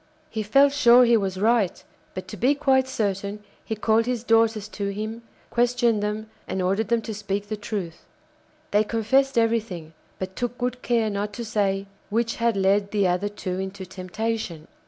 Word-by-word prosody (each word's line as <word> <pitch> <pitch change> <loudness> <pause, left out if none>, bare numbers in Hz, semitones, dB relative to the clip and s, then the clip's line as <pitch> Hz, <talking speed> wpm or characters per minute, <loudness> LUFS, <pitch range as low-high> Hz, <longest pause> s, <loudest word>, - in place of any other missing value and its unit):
He 220 - -2
felt 275 +7 +4
sure 250 -3 +7
he 235 0 +5
was 190 -3 -1
right; 215 -3 +2 0.3
but 185 0 -6
to - - -6
be 270 +4 +2
quite 265 -2 +3
certain 205 -3 -2 0.2
he 220 - -3
called 220 +2 +2
his 245 -3 -1
daughters 225 -2 +3
to 200 -2 -4
him, 215 +3 -4 0.3
questioned 240 -2 +2
them, 210 +1 -2 0.2
and 190 - -3
ordered 195 +4 +1
them 230 +1 +1
to 220 - -5
speak 205 0 -3
the 215 - -1
truth. 200 -5 -5 0.7
They 210 +1 +4
confessed 240 +5 +1
everything, 220 -8 0 0.2
but 190 0 -5
took 245 0 -3
good 250 0 -2
care 230 -3 +1
not 205 +1 -3
to 235 +2 -5
say 195 -2 0 0.2
which 230 +2 0
had 230 -2 +1
led 200 +1 +2
the 200 -3 +2
other 180 +3 0
two 185 -3 -4
into 190 0 -5
temptation. 185 -2 -4
215 Hz, 175 wpm, -24 LUFS, 200-235 Hz, 0.7 s, sure